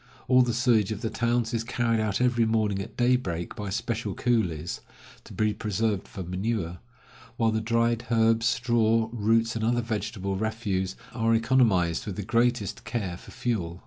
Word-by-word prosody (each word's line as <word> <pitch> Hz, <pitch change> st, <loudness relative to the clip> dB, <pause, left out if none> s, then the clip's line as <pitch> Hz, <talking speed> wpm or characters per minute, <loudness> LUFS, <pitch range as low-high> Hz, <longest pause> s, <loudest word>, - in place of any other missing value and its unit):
All 125 Hz, 0 st, +6 dB
the 125 Hz, -1 st, +2 dB
sewage 115 Hz, -4 st, +2 dB
of 105 Hz, -1 st, -4 dB
the 110 Hz, -, -2 dB
towns 120 Hz, 0 st, 0 dB
is 115 Hz, -1 st, 0 dB
carried 115 Hz, -1 st, 0 dB
out 105 Hz, -2 st, 0 dB
every 120 Hz, -2 st, +3 dB
morning 105 Hz, -3 st, +1 dB
at 100 Hz, -, -9 dB
daybreak 120 Hz, -9 st, 0 dB
by 105 Hz, -1 st, -5 dB
special 115 Hz, +3 st, -2 dB
coolies, 90 Hz, -10 st, -1 dB, 0.4 s
to -, -, -13 dB
be 105 Hz, -1 st, 0 dB
preserved 105 Hz, -1 st, -1 dB
for 95 Hz, -, -7 dB
manure; 90 Hz, -1 st, -3 dB, 0.6 s
while 115 Hz, -1 st, +2 dB
the 110 Hz, 0 st, 0 dB
dried 115 Hz, +1 st, +1 dB
herbs, 115 Hz, 0 st, +3 dB
straw, 115 Hz, -2 st, +2 dB
roots, 115 Hz, +1 st, +2 dB
and 110 Hz, -, -2 dB
other 120 Hz, +2 st, +2 dB
vegetable 105 Hz, -3 st, -3 dB
refuse, 100 Hz, -3 st, -2 dB, 0.2 s
are 115 Hz, -1 st, +2 dB
economized 115 Hz, -9 st, +2 dB
with 100 Hz, -, -4 dB
the 105 Hz, -, -4 dB
greatest 115 Hz, -1 st, 0 dB
care 100 Hz, -8 st, -3 dB
for -, -, -14 dB
fuel. 110 Hz, -9 st, -3 dB
110 Hz, 170 wpm, -27 LUFS, 100-120 Hz, 0.6 s, All